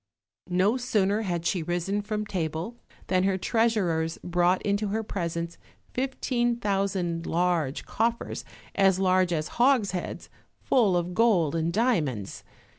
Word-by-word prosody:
No 190 +7 +2
sooner 215 -4 +1
had 175 -5 -2
she 180 0 +1
risen 175 +5 -1
from 210 0 -3
table 175 +2 -3 0.3
than 185 -1 +2
her 190 0 +2
treasurers 185 -8 +1
brought 175 +1 +2
into 205 +1 0
her 220 +3 -1
presence 170 -4 -4 0.3
fifteen 250 -2 0
thousand 195 -6 -1
large 170 -5 0
coffers, 230 +1 -1 0.3
as 195 -2 +4
large 185 -1 +3
as 155 -2 -1
hogsheads, 230 -9 +1 0.3
full 210 -9 +3
of 175 +1 -2
gold 185 -8 +3
and 165 0 0
diamonds. 160 - 0
190 Hz, 125 wpm, -27 LUFS, 170-215 Hz, 0.3 s, as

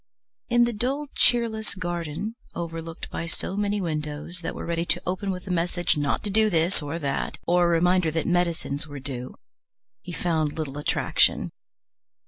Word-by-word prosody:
In 240 0 +5
the 240 0 +2
dull, 270 +7 -1
cheerless 225 -3 +2
garden, 175 +2 -3 0.2
overlooked 165 -1 -5
by 170 - -3
so 175 +3 -2
many 205 0 +1
windows 155 0 -3
that 165 - -4
were - - -5
ready 170 0 0
to - - +2
open 185 +2 -1
with 180 -1 -3
a 190 - -4
message 175 0 +1
not 145 -2 0
to 205 - -1
do 215 +1 +4
this 170 0 +2
or 145 +2 -3
that, 140 -4 -2
or 175 0 +4
a 170 -1 +4
reminder 180 0 +4
that 160 0 -1
medicines 170 -4 0
were 145 -1 -7
due, 130 -2 -6 0.7
he 180 - -7
found 160 -4 0
little 145 -2 -3
attraction. 150 - +2
170 Hz, 170 wpm, -26 LUFS, 155-190 Hz, 0.7 s, In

